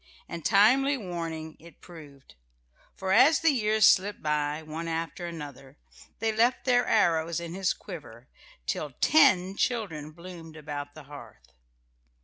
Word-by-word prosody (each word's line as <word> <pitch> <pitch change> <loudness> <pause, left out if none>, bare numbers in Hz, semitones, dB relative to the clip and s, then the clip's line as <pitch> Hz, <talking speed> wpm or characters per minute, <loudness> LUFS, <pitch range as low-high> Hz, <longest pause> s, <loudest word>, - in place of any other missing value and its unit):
And 170 -1 -7
timely 260 +8 +4
warning 165 -6 -6
it 170 +1 -16
proved, 145 -6 -14 0.6
for 190 -1 -3
as 260 +9 +5
the 325 -1 +4
years 215 -5 +2
slipped 200 0 +3
by, 150 0 -1
one 160 +2 -6
after 165 +1 -4
another, 145 -4 -9 0.4
they 225 +1 0
left 235 +3 +1
their 245 -1 +3
arrows 170 -5 +2
in 170 -1 -7
his 190 0 0
quiver 135 - -10 0.4
till 150 - -3
ten 195 - +4
children 195 -12 -2
bloomed 165 -1 -11
about 145 -1 -7
the 155 - -11
hearth. 115 - -14
170 Hz, 135 wpm, -27 LUFS, 150-210 Hz, 0.6 s, as